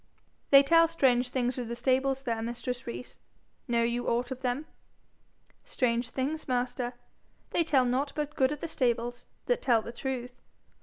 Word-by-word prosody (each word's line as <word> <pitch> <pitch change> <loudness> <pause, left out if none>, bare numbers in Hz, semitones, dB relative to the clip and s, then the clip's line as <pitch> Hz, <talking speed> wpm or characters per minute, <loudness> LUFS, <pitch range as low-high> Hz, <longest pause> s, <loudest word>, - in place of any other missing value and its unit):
'They 275 0 +8
tell 330 +3 +5
strange 255 -6 +2
things 250 0 -1
of 245 - -4
the 235 - -4
stables 265 +2 +1
there, 230 -3 -2
mistress 240 +1 -4
Rees: 240 +1 -7 0.5
know 235 -1 +2
you 235 +1 -1
aught 240 +2 0
of 260 - -4
them?' 260 +3 -1 1.0
'Strange 235 -1 0
things, 280 +6 -3
master? 250 -1 -1 0.6
They 340 - +2
tell 280 -5 +3
nought 260 +4 0
but 300 0 -3
good 265 -1 +2
of 295 - -5
the - - -3
stables 240 -4 -1 0.2
that - - +1
tell 230 -4 +3
the - - -6
truth. 250 0 -5
250 Hz, 165 wpm, -29 LUFS, 240-275 Hz, 1.0 s, They